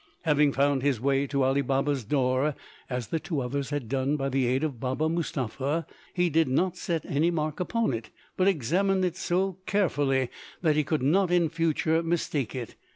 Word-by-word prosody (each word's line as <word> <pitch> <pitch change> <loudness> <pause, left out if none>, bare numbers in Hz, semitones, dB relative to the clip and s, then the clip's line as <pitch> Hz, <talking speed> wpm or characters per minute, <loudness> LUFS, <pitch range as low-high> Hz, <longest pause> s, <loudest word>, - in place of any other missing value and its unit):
Having 150 -3 +3
found 140 0 +2
his 135 -4 +1
way 135 +2 +1
to 140 0 0
Ali 135 +2 +2
Baba's 135 0 0
door, 130 +4 +1 0.3
as 125 -4 -3
the 165 - 0
two 155 -2 -3
others 135 +2 -2
had 145 -5 -3
done 135 +4 0
by 135 -1 -1
the 135 -2 +1
aid 130 +4 +1
of 140 -7 -2
Baba 130 +5 -1
Mustapha, 155 -2 -2 0.3
he 180 -1 +3
did 165 0 +2
not 175 +8 +1
set 165 -4 -2
any 150 +5 +1
mark 155 -3 -2
upon 220 - 0
it, 115 -1 -5 0.3
but 185 - +2
examined 190 - +2
it 175 -2 -2
so 185 +1 -1
carefully 145 -10 +1 0.3
that 155 -3 +3
he 150 - +2
could 150 -2 -1
not 180 +7 +3
in 175 -2 +3
future 165 0 +1
mistake 160 -7 -1
it. 120 -4 -5
145 Hz, 190 wpm, -27 LUFS, 135-165 Hz, 0.3 s, Having